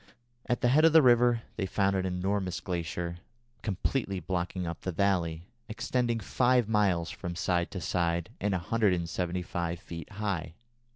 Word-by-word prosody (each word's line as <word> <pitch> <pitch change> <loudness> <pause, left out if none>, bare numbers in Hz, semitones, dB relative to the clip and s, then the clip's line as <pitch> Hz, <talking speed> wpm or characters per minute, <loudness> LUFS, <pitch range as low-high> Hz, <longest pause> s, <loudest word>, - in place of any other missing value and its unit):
At 120 - 0
the 120 - +3
head 150 +5 +5
of 165 -1 +6
the 160 - +9
river 120 -1 +5
they 95 -3 -1
found 100 0 +1
an 95 -1 0
enormous 95 0 -1
glacier 85 -1 -3 0.4
completely 100 0 -1
blocking 90 +1 -2
up 85 0 -5
the 95 - -2
valley, 85 -3 0 0.3
extending 120 0 0
five 125 +2 +2
miles 100 -6 +2
from 85 0 -6
side 90 -2 0
to 95 - -6
side, 85 0 0
and 100 0 0
175 90 -3 -1
feet 85 -2 -8
high. 95 -6 -3
95 Hz, 150 wpm, -29 LUFS, 85-110 Hz, 0.4 s, the